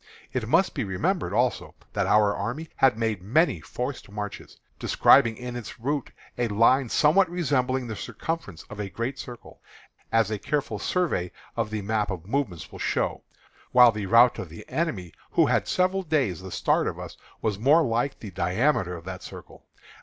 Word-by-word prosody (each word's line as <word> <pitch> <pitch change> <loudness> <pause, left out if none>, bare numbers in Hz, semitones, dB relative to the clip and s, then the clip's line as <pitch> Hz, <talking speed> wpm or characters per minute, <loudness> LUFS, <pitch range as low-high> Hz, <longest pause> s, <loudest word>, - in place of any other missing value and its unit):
It 120 -4 -2
must 170 +7 +3
be - - -2
remembered, 95 -3 -1
also, - - 0 0.2
that - - 0
our 105 -1 +4
army 150 +10 -4
had 130 -5 +4
made 110 -4 -1
many 120 - +2
forced 125 - -5
marches, 105 0 -7 0.2
describing 115 -2 +5
in 125 0 -6
its 120 -1 -7
route 140 +3 -2 0.3
a 120 - +2
line 115 +4 +3
somewhat 165 - +4
resembling 130 -7 0
the 110 -2 -5
circumference 160 - -5
of 105 - -11
a 100 -1 -3
great 120 +6 -4
circle, 120 -1 -10 0.5
as 115 -2 +2
a 105 - -2
careful 135 -7 -2
survey 150 - -1 0.2
of 115 -2 -1
the 110 -1 -4
map 105 +1 0
of 90 -4 -5
movements 105 - -3
will - - -10
show; - - -1 0.5
while 125 -1 +8
the 105 -2 -4
route 120 +3 +5
of 90 - -6
the 80 - -11
enemy, 105 - -2 0.2
who - - +5
had - - +1
several 185 +1 +1
days 140 - 0
the 95 - -8
start - - +1
of - - -3
us, - - -8 0.3
was 105 -3 -1
more 145 +8 +5
like 120 +2 0
the 105 - -7
diameter 95 +2 +1
of 85 - -13
that 95 0 -6
circle. - - -12
115 Hz, 180 wpm, -26 LUFS, 100-140 Hz, 0.5 s, while